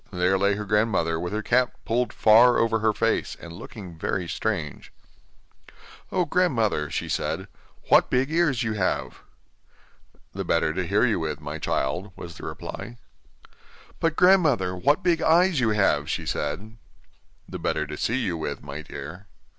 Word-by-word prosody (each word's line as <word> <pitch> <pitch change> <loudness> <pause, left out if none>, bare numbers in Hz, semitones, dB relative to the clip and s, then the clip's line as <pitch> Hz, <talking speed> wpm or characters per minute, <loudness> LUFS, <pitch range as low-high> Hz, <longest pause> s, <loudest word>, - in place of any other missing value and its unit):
There 90 0 +1
lay 100 +1 +2
her 105 +1 -5
grandmother 100 -6 +1
with 90 +1 -4
her 110 +1 -2
cap 125 +2 +2
pulled 120 +2 0
far 115 +3 +6
over 115 -1 +2
her 110 0 +2
face, - - -1
and 85 -1 -10
looking 90 -2 -10
very 90 +1 -2
strange. 85 -5 -3 1.2
'Oh! 180 - +1
grandmother,' 120 - +1
she - - -3
said, - - -2 0.4
'what - - +5
big 130 +3 +1
ears 155 -7 +2
you 110 -1 -1
have!' 95 -4 -2 1.1
'The 95 - -4
better 85 -3 +1
to 90 0 -2
hear 100 +6 +3
you 115 -6 +1
with, 80 -2 -3
my - - -6
child,' 90 +9 -2
was 85 -1 -9
the - - -9
reply. 120 0 -7 1.0
'But, 165 -1 +1
grandmother, 150 - +4
what 145 - +1
big 170 -2 +2
eyes 170 0 +4
you 120 -3 +2
have!' 95 -9 +2
she - - -2
said. 110 +5 -4 0.7
'The - - -7
better 75 - -1
to 75 +1 -7
see 115 - -1
you 95 -9 -1
with, 80 - -5
my 70 +1 -7
dear. 90 +5 -9
105 Hz, 160 wpm, -25 LUFS, 90-125 Hz, 1.2 s, far